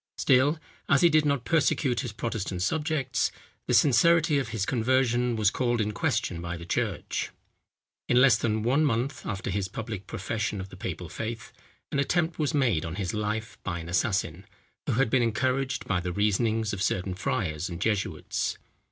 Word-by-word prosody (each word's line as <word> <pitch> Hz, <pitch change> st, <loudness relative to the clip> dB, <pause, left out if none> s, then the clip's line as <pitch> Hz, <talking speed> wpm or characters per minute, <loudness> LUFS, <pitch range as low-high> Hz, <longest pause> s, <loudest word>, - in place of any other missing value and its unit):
Still, 135 Hz, +5 st, +4 dB, 0.3 s
as 140 Hz, -, +5 dB
he 170 Hz, -, +7 dB
did 155 Hz, -1 st, +3 dB
not 140 Hz, -4 st, 0 dB
persecute 140 Hz, -5 st, +2 dB
his 125 Hz, -4 st, -3 dB
Protestant 105 Hz, -5 st, -3 dB
subjects, 150 Hz, -, 0 dB, 0.4 s
the -, -, +1 dB
sincerity 160 Hz, +2 st, +4 dB
of 135 Hz, -, -2 dB
his 110 Hz, -3 st, -2 dB
conversion 125 Hz, 0 st, +1 dB
was 105 Hz, -2 st, +3 dB
called 120 Hz, -2 st, 0 dB
in 105 Hz, -1 st, 0 dB
question 85 Hz, -4 st, -1 dB
by 85 Hz, 0 st, -4 dB
the 85 Hz, -, -9 dB
church. 90 Hz, -, -2 dB, 0.8 s
In 120 Hz, -, +5 dB
less 130 Hz, -2 st, +7 dB
than 110 Hz, -1 st, 0 dB
one 135 Hz, +6 st, +3 dB
month 130 Hz, 0 st, 0 dB
after 100 Hz, -1 st, -3 dB
his 95 Hz, 0 st, -1 dB
public 105 Hz, 0 st, -6 dB
profession 105 Hz, +1 st, -3 dB
of 95 Hz, +1 st, -6 dB
the -, -, -11 dB
papal 90 Hz, -1 st, -5 dB
faith, 110 Hz, +7 st, -6 dB, 0.4 s
an 140 Hz, -, 0 dB
attempt 165 Hz, +3 st, 0 dB
was 150 Hz, -3 st, +1 dB
made 120 Hz, -, +2 dB
on 80 Hz, +1 st, -5 dB
his 95 Hz, -3 st, -3 dB
life 105 Hz, +1 st, -3 dB
by 90 Hz, -3 st, -3 dB
an 85 Hz, 0 st, -7 dB
assassin, 90 Hz, -1 st, -1 dB, 0.4 s
who -, -, +1 dB
had 120 Hz, -1 st, +2 dB
been 130 Hz, -, +4 dB
encouraged 130 Hz, +3 st, 0 dB
by 95 Hz, -2 st, 0 dB
the 90 Hz, 0 st, -3 dB
reasonings 105 Hz, +3 st, +1 dB
of 100 Hz, -, -4 dB
certain 90 Hz, -1 st, 0 dB
friars 90 Hz, -4 st, -2 dB
and 85 Hz, -1 st, -6 dB
jesuits. 105 Hz, -2 st, -1 dB
115 Hz, 180 wpm, -27 LUFS, 95-130 Hz, 0.8 s, he